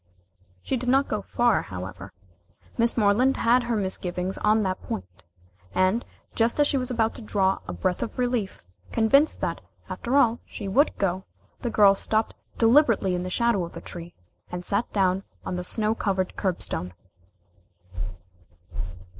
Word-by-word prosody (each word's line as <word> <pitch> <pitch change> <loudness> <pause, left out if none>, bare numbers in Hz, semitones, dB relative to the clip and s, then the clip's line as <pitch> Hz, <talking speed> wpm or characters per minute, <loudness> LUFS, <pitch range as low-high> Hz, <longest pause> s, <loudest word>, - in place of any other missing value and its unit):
She 265 - -1
did 250 +1 -2
not 270 +2 +4
go 215 - -2
far, 240 +1 +2
however. 95 +1 -8 0.6
Miss 235 0 +2
Moreland 230 +5 +3
had 240 +2 +4
her 235 -1 0
misgivings 185 -2 -2
on 215 +1 +3
that 185 -1 -2
point. 90 0 -7 0.5
And, 185 +6 +2 0.3
just 230 +4 +1
as 290 - +6
she 285 - +1
was 255 -1 0
about 230 -2 +1
to - - -9
draw 195 -3 +1
a - - -4
breath 185 -2 -1
of 230 - -4
relief, 245 - -1 0.3
convinced 275 +7 +3
that, - - -2 0.3
after 245 +3 -2
all, 235 -4 +4
she 205 - -7
would 275 +10 +2
go, 190 0 -1 0.3
the 240 - -2
girl 205 -3 +6
stopped 215 +2 0 0.2
deliberately 230 -5 +4
in 180 - -1
the 185 - -4
shadow 235 -1 +1
of 170 - -7
a - - -4
tree, 175 0 -9 0.4
and 180 0 -5
sat 200 +4 0
down 190 -2 +2 0.2
on - - -3
the 180 - -3
snow 215 +3 0
covered 190 -4 -1
curbstone. 175 - -2
210 Hz, 160 wpm, -25 LUFS, 185-235 Hz, 0.6 s, as